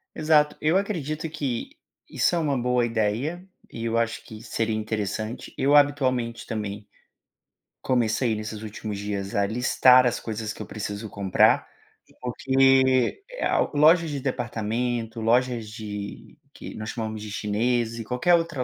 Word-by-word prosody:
Exato, 150 -1 +3
eu 155 +4 +2
acredito 165 -6 -2
que 135 -6 -3 0.4
isso - - +1
é - - +1
uma 145 -5 0
boa 125 0 +1
ideia, 120 - -1 0.2
e 115 - -5
eu 115 0 0
acho 115 -1 -1
que 110 -1 -10
seria 115 -1 -2
interessante, 110 +1 -4
eu 140 +2 +3
habitualmente 130 -5 +2
também 105 -2 -5 0.9
comecei 120 -1 +1
nesses 105 0 -6
últimos 105 -1 -5
dias 100 -1 -4
a 100 - +3
listar 125 +3 +5
as 120 - -1
coisas 110 -1 -4
que - - -9
eu - - -9
preciso 105 0 -5
comprar, 100 -2 +2 0.5
porque 130 - +3 0.2
a - - +2 0.2
loja 160 +3 +5
de 145 -2 -3
departamento, 120 -2 -2
lojas 120 -1 +1
de 105 -2 -7 0.2
que - - -9
nós 110 0 -6
chamamos 110 -2 -4
de 105 -1 -7
chineses 115 +3 -1
e - - -4
qualquer 125 +10 +1
outra 165 -6 +1
115 Hz, 145 wpm, -25 LUFS, 110-135 Hz, 0.9 s, listar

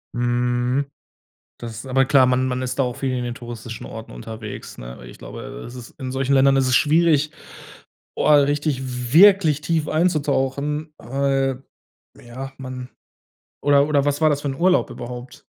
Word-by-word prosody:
Mhm. 120 +2 0 0.8
Das 115 +1 -7
aber 135 +1 +3
klar, 135 0 +5
man 130 +1 +2
man 125 0 -2
ist 130 +1 -4
da - - +4
auch 125 -2 -2
viel 135 -2 -2
in 125 - -2
den 120 -1 -4
touristischen 120 -2 -8
Orten 110 0 -9
unterwegs, 105 - -8
ne? - - -9
Weil - - -11
ich - - -13
glaube, - - -9 0.2
äh, - - -9
es 120 - -10
ist 125 -1 -10
in 130 -1 -4
solchen 135 +1 -1
Ländern 135 0 +5
ist 135 -1 +2
es 130 - +2
schwierig, 155 0 +3 0.9
boah, 150 - +4
richtig 135 -4 -2
wirklich 175 -4 +6
tief 160 -2 0
einzutauchen, 150 -2 0
weil, 135 +1 -1 0.6
ja, 130 +3 -8
man 130 -1 -7 0.7
oder 145 0 +4
oder 145 -2 +2
was 145 +1 0
war 155 - +5
das 145 -1 0
für 145 - -3
'n 135 - -2
Urlaub 180 +2 +2
überhaupt? 125 +1 -9
135 Hz, 175 wpm, -22 LUFS, 125-145 Hz, 0.9 s, wirklich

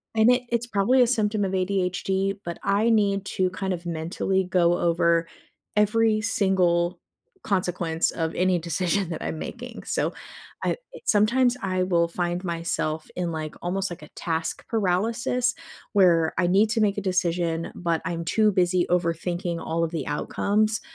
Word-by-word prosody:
and 220 +2 +5
it 250 0 +2
it's 235 0 0
probably 240 +4 +3
a - - +2
symptom 215 -4 +1
of 190 - -2
ADHD, 190 +1 0
but 170 0 -5
I 205 +3 +2
need 200 -3 +2
to 185 -1 +2
kind 190 +1 -3
of 175 -1 -6
mentally 170 +3 -1
go 175 -1 +2
over 170 -1 +2 0.5
every 215 +1 +3
single 180 -5 +1 0.4
consequence 180 -4 0
of 160 -1 -3
any 180 -1 +2
decision 175 +3 0
that 160 - -5
I'm 160 - -4
making. 245 +4 -7
So, - - 0 0.5
uh, - - +2 0.3
sometimes 240 +4 +3
I 185 -1 0
will 170 -2 +2
find 175 +1 -2
myself 165 -2 -2
in, 175 -2 -2
like, 155 -1 -5
almost 190 +2 -1
like 175 - -8
a 150 - -12
task 165 -1 -3
paralysis 230 +5 0 0.4
where 170 -5 +4
I 180 0 +2
need 200 +5 +4
to 225 -1 +1
make 205 -1 +2
a - - -1
decision, 170 -3 -1
but 170 -2 -1
I'm 170 -1 -3
too 215 +5 +3
busy 180 -1 +2
overthinking 175 0 -1
all 165 +1 -1
of 160 - -6
the 160 -6 -3
outcomes; 215 +8 0
185 Hz, 160 wpm, -25 LUFS, 170-210 Hz, 0.5 s, and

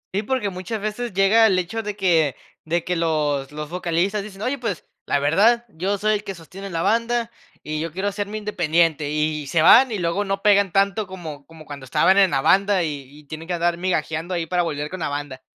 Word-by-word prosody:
Sí, 200 - +1
porque, 220 -3 -2
muchas 185 +5 -5
veces 215 +4 -4
llega 200 +4 +5
el 190 -3 +2
hecho 185 +5 -2
de 210 -2 -5
que 165 -8 +2 0.3
de 170 +1 -1
que 180 - -2
los 150 -4 0
los 150 +1 -7
vocalistas 180 +3 -1
dicen: 200 0 -9
"Oye, 270 +3 -1
pues, 225 -8 -4 0.2
la - - +2
verdad, 205 +12 +3
yo 195 +2 -2
soy 215 +2 +1
el 210 0 -2
que 195 - -6
sostiene 190 +4 -10
la 165 -2 -2
banda 230 +2 0 0.3
y 155 0 -4
yo 165 +1 -3
quiero 190 +5 -2
hacerme 205 +1 -4
independiente", 165 -7 +1
y 150 0 -1
y 145 - -9
se 155 +3 +2
van, 245 +8 +7
y 215 - -2
luego 175 +3 -1
no 195 -1 -3
pegan 200 -2 +4
tanto 200 +2 +1
como 160 -6 -9
como 160 -1 -14
cuando 140 -2 -9
estaban 190 +8 +3
en 195 -1 +5
la 135 - 0
banda, 195 +4 +3
y 145 -3 -4 0.2
y - - -22
tienen 155 +3 -9
que 180 - -1
andar 170 0 0
migajeando 175 -1 -2
ahí, 170 -1 -2
para 180 +2 0
volver 150 -3 -3
con 185 - -6
la 160 - -2
banda. 145 -2 -5
180 Hz, 230 wpm, -22 LUFS, 155-205 Hz, 0.3 s, van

